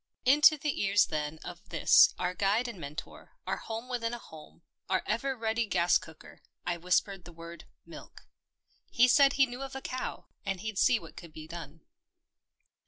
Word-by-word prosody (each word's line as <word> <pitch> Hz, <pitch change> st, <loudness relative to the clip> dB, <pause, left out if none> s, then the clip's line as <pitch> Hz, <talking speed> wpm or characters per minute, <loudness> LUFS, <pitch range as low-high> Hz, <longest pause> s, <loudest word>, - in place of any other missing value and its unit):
Into 300 Hz, +4 st, +6 dB
the 290 Hz, 0 st, -2 dB
ears 200 Hz, +1 st, +4 dB
then 150 Hz, 0 st, -4 dB
of 175 Hz, -1 st, -10 dB
this -, -, +5 dB
our 180 Hz, 0 st, -2 dB
guide 205 Hz, +6 st, +1 dB
and 220 Hz, -6 st, -8 dB
mentor, 150 Hz, 0 st, -9 dB
our -, -, -2 dB
home 225 Hz, +2 st, -6 dB
within 240 Hz, -2 st, -3 dB
a -, -, -6 dB
home, 160 Hz, -5 st, -15 dB, 0.3 s
our 185 Hz, -1 st, +1 dB
ever 260 Hz, +5 st, -2 dB
ready 225 Hz, 0 st, -1 dB
gas 175 Hz, -3 st, +3 dB
cooker, 160 Hz, -1 st, -15 dB, 0.2 s
I 175 Hz, -1 st, -1 dB
whispered 180 Hz, +2 st, 0 dB
the 175 Hz, -, -12 dB
word 170 Hz, 0 st, -11 dB, 0.2 s
milk. -, -, -13 dB, 0.7 s
He 250 Hz, +1 st, +4 dB
said 275 Hz, +2 st, +5 dB
he 270 Hz, -, +4 dB
knew 250 Hz, +1 st, -8 dB
of 270 Hz, 0 st, -7 dB
a 270 Hz, -, -5 dB
cow, 255 Hz, -, -5 dB, 0.2 s
and 195 Hz, -2 st, -3 dB
he'd 215 Hz, -2 st, -4 dB
see 250 Hz, -, +4 dB
what 165 Hz, -1 st, -13 dB
could 170 Hz, -3 st, -11 dB
be 155 Hz, 0 st, -10 dB
done. 165 Hz, -1 st, -9 dB
195 Hz, 180 wpm, -30 LUFS, 170-245 Hz, 0.7 s, Into